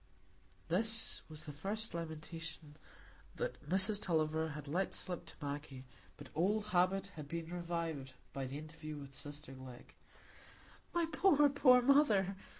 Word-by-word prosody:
This 220 +6 +2
was 155 -1 -8
the 150 - -5
first 200 +9 -2
lamentation 165 -1 -6 0.6
that - - -3
Mrs 195 +3 +4
Tulliver 160 -2 +1
had 150 -1 -8
let 180 +7 0
slip 180 -2 -1
to - - -11
Maggie, 145 -3 -5 0.3
but - - -10
old 205 +6 +2
habit 190 +2 +2
had 150 -3 -7
been 165 +2 -4
revived 165 -6 -3 0.2
by 135 -1 -2
the 135 +2 -5
interview 155 0 -7
with 140 -1 -9
sister 145 +1 -8
Glegg. 130 -2 -11 1.0
"My 345 -1 +2
poor, 300 -4 +6
poor 255 -3 +6
mother!" 225 -9 +5
165 Hz, 140 wpm, -36 LUFS, 150-195 Hz, 1.0 s, poor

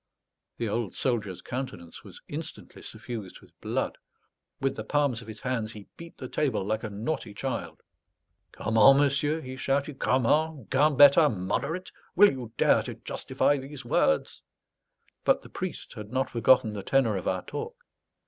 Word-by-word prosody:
The 115 - -2
old 110 -1 -2
soldier's 110 -8 -2
countenance 125 -10 -6
was - - -12
instantly - - -8
suffused 110 -5 -7
with - - -20
blood; - - -2 0.6
with 135 0 0
the 110 - -5
palms 140 -1 0
of 115 - -13
his 110 -1 -8
hands 115 -4 -2
he 105 -2 -10
beat 170 0 -12
the 130 - -6
table 125 -8 -1
like 110 +2 -1
a 110 - -3
naughty 105 +1 -4
child. 85 - -4 0.7
"Comment, 115 +5 +5
monsieur?" 145 +2 +2
he 130 -3 -7
shouted. 140 +1 -1
"Comment? 140 +2 +1
Gambetta 145 +2 +6
moderate? 140 - -3 0.2
Will 205 +3 +7
you 125 -4 -7
dare - - +4
to - - -6
justify 145 - 0
these 135 -1 -9
words?" 80 -9 +1 0.8
But - - +3
the - - -13
priest - - -6
had 105 0 -9
not 130 +1 -1
forgotten 115 -1 +4
the 100 - -4
tenor 120 -1 +2
of 95 - -4
our - - -1
talk. - - -7
130 Hz, 160 wpm, -28 LUFS, 110-140 Hz, 0.8 s, Will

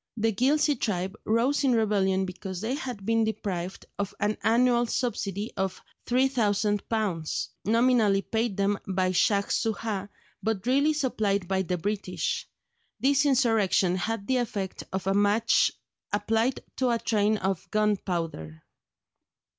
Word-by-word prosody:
The 225 0 +1
Ghilzye 280 +4 +2
tribe 190 -1 -2
rose 245 +7 +2
in 265 -3 +3
rebellion 195 -4 +2
because 185 0 -6
they 225 +6 -2
had 250 -8 -5
been 225 +1 +2
deprived 195 -4 -3
of 200 -1 -3
an 210 +1 +1
annual 240 +1 +3
subsidy 210 -4 -2
of 190 -1 -2 0.3
£3000, 215 - 0 0.2
nominally 225 -3 +3
paid 225 -3 -1
them 200 0 +1
by 185 -1 +1
Shaj 200 +2 +2
Soojah, 215 -3 -1 0.3
but 220 -3 -2
really 280 +5 +3
supplied 215 -10 0
by 190 0 +1
the 180 -1 -2
British. 200 0 -2 0.5
This 280 +4 +3
insurrection 225 -9 +3
had 200 +3 -2
the 260 +2 +1
effect 205 -6 -3
of 190 -1 -3
a 195 - +2
match 205 +3 +3 0.4
applied 225 +5 0 0.2
to 255 -1 +1
a 235 - +2
train 215 -1 +1
of 190 -3 -2
gunpowder. 170 - -1
210 Hz, 130 wpm, -27 LUFS, 195-235 Hz, 0.5 s, in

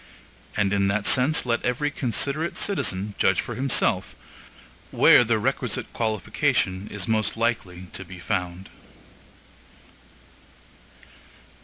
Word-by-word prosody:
And 100 -1 +1
in 100 -1 +2
that 100 +1 -1
sense 135 +5 +4
let 120 -1 -1
every 145 +4 -1
considerate 145 +5 -2
citizen 105 - -1
judge 95 -1 +3
for 120 - -3
himself 130 +2 +1 0.7
where - - +6
the 115 -1 +1
requisite 125 +2 -2
qualification 105 -3 -1
is 100 -3 -4
most 110 0 0
likely 105 -6 -2
to 95 - -4
be 90 0 -11
found. 90 0 -4
110 Hz, 110 wpm, -24 LUFS, 95-125 Hz, 0.7 s, where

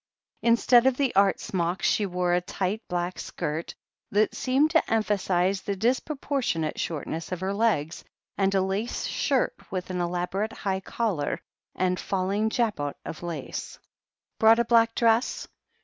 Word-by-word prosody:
Instead 235 +1 +5
of 260 -1 +2
the 275 -3 +1
art 195 0 +4
smock, 175 0 -2
she 205 - +2
wore 180 -1 0
a 180 - +2
tight 190 +4 -2
black 175 +1 -2
skirt, 155 +3 -4 0.3
that 210 +2 +2
seemed 275 +4 +2
to 325 - +2
emphasize 195 -3 +1
the 200 - -3
disproportionate 250 - -1
shortness 160 +1 -4
of 185 - -2
her 190 +2 -2
legs, 200 -8 0 0.3
and 195 0 +1
a 190 - +3
lace 195 +5 -2
shirt 270 -4 +1 0.2
with 185 -1 -4
an 180 -1 -1
elaborate 180 +5 -2
high 190 -3 -2
collar 190 -5 -2 0.4
and 180 -1 0
falling 195 +3 0
jabot 210 - -1
of 160 - -7
lace. 170 -5 -5 0.6
"Brought 225 +1 +7
a 235 - +2
black 230 -1 +4
dress 230 +1 +2
195 Hz, 150 wpm, -26 LUFS, 180-230 Hz, 0.6 s, Brought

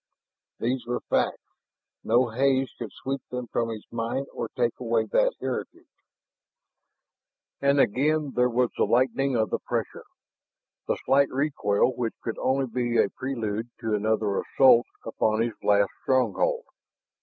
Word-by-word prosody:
Those 125 +2 -1
were 125 - -2
facts; - - +1 0.6
no 120 +2 +3
haze 135 +2 +1
could - - -5
sweep 135 0 -4
them 125 0 -4
from 115 0 -1
his 110 -2 -6
mind 115 +4 -2
or - - -4
take 480 - 0
away 470 - +1
that - - +3
heritage. - - -5 1.8
And 140 0 +3
again 145 +5 +2
there 125 0 +3
was 125 0 +1
the - - +2
lightening 130 +2 +2
of 110 -4 +1
the - - 0
pressure, - - -4 0.8
the - - 0
slight 140 +1 +4
recoil, 130 -5 +1
which 115 -2 -2
could 115 - -4
only 135 +1 +1
be 120 -1 -1
a - - +4
prelude 115 -3 -4
to 110 -2 -1
another 105 -1 +1
assault 125 -3 +5 0.2
upon 110 0 +1
his 115 -1 -2
last 100 -1 +3
stronghold. 460 - +1
125 Hz, 145 wpm, -26 LUFS, 115-135 Hz, 1.8 s, assault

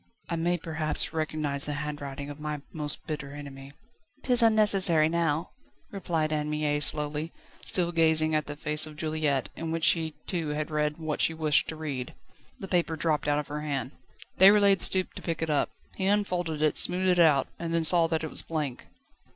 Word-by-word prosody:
"I 170 - -1
may 175 +2 0
perhaps 160 -1 -2
recognise 155 -3 -1
the 145 - -2
handwriting 145 -1 -6
of 145 - -11
my 150 -1 -5
most 150 -2 -2
bitter 140 -3 -6
enemy." 140 -1 -10 0.5
"'Tis 250 -2 +6
unnecessary 200 -8 +4
now," 165 -1 -1 0.4
replied 165 -6 -2
Anne 150 0 -2
Mie 150 -1 -1
slowly, 150 +2 +1 0.3
still 175 -2 0
gazing 160 -1 +3
at 155 -1 0
the 145 - -6
face 150 +1 +2
of 155 - -11
Juliette, 155 -3 -1
in 165 - -5
which 165 0 -3
she 160 -2 +1
too 170 -4 -3
had 150 +1 -3
read 150 0 -1
what 155 -2 -3
she 165 - +1
wished 155 -2 +2
to 160 - -5
read. 140 -6 -6 0.4
The 195 - -7
paper 175 -3 0
dropped 155 -2 -1
out 145 0 +2
of 150 - -4
her 150 +1 -4
hand. 140 -4 -3 0.5
Déroulède 200 0 +6
stooped 185 -1 +2
to - - -7
pick 165 -1 -3
it 160 - -2
up. 145 - +1 0.2
He 190 - -2
unfolded 180 -6 -1
it, 155 - +2
smoothed 185 +1 +3
it 180 -1 +3
out, 150 -5 +4
and 165 0 -4
then 165 0 +1
saw 165 +1 +5
that 160 -1 -2
it 160 - -4
was - - +1
blank. 150 -6 -5
155 Hz, 190 wpm, -27 LUFS, 150-170 Hz, 0.5 s, Tis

